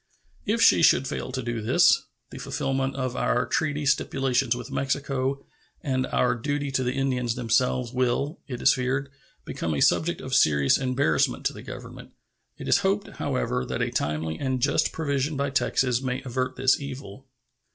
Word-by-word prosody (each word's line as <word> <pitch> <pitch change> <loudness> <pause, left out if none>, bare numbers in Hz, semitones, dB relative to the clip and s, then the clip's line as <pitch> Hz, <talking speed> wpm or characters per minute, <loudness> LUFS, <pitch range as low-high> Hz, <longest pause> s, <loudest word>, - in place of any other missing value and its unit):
If 230 +2 +2
she - - +6
should 135 -4 +4
fail 130 - -4
to 130 0 -3
do 120 -1 -3
this, 110 - +4 0.2
the - - -8
fulfillment 135 0 -2
of 130 -2 -3
our 120 - +1
treaty 150 -2 -1
stipulations 135 -2 +1
with 125 - -8
Mexico 135 0 -2 0.4
and 130 -3 -1
our 125 - +2
duty 145 +3 -2
to 130 -1 0
the 125 0 -1
Indians 125 -3 0
themselves 125 +1 0
will, 130 +5 0
it 125 -3 -6
is 140 - +6
feared, 135 +2 -2 0.3
become 80 -2 -3
a - - -1
subject 170 - +2
of 130 - -6
serious 75 - +4
embarrassment 130 - +1
to - - +1
the - - -10
Government. - - -10 0.4
It - - -8
is - - +4
hoped, - - -1
however, 60 0 -1
that - - -2
a - - -2
timely 80 +2 -2
and 130 -2 -1
just 140 +4 +2
provision 145 -1 -1
by 140 0 -1
Texas 130 -2 +1
may 130 -1 -3
avert 130 0 -2
this 130 0 +3
evil. 135 -3 -8
130 Hz, 170 wpm, -25 LUFS, 125-140 Hz, 0.4 s, she